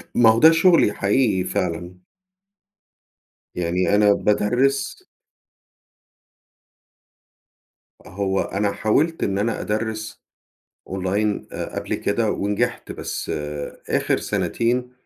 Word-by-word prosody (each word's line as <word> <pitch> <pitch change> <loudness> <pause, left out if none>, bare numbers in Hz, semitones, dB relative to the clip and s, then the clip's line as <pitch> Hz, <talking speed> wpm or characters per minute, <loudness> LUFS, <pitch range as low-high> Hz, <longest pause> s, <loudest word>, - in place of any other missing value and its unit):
ما 115 -2 +6
هو 115 +1 +4
ده 160 +1 +8
شُغلي 165 - +4
حقيقي 100 -2 +1
فعلًا. 90 -2 -3 1.6
يعني 90 +3 +1
أنا 105 -1 +5
بادَرّس. 125 +8 0 3.0
هو 95 0 -1
أنا 100 +1 -1
حاولت 155 +10 +1
إن 100 0 0
أنا 115 +2 -1
أدَرّس 110 0 -4 0.7
أونلاين 100 +3 -1
آآ، - - -6
قبل - - -3
كده 105 +1 0
ونجحت، 100 0 -2
بس - - -5 0.6
آخر - - +1
سنتين، 125 +2 -1
105 Hz, 90 wpm, -22 LUFS, 100-120 Hz, 3.0 s, ده